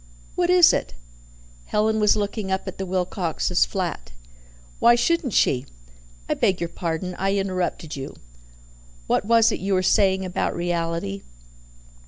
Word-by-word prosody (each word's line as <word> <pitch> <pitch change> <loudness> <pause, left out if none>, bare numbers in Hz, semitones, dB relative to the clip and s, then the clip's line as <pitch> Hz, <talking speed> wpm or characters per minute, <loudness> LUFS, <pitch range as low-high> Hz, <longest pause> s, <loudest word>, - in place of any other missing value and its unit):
"What 355 -1 0
is 360 -2 +7
it?" - - -3 0.7
"Helen 220 +1 +1
was 210 0 +4
looking 205 -1 -3
up 190 +1 -2
at 190 - -7
the 190 - -3
Wilcoxes' 180 - 0
flat." - - -4 0.7
"Why 235 - +6
shouldn't 280 - 0
she?" 125 -2 +2 0.6
"I - - +1
beg 190 -2 +1
your 170 - -3
pardon, 170 +2 -4
I 195 +1 0
interrupted 185 -5 -2
you. 135 -1 -7 0.9
What - - 0
was 230 +1 +4
it - - -3
you 195 0 0
were 185 - +1
saying 190 0 +2
about 180 - -2
reality?" 165 - -2
190 Hz, 145 wpm, -23 LUFS, 170-210 Hz, 0.9 s, is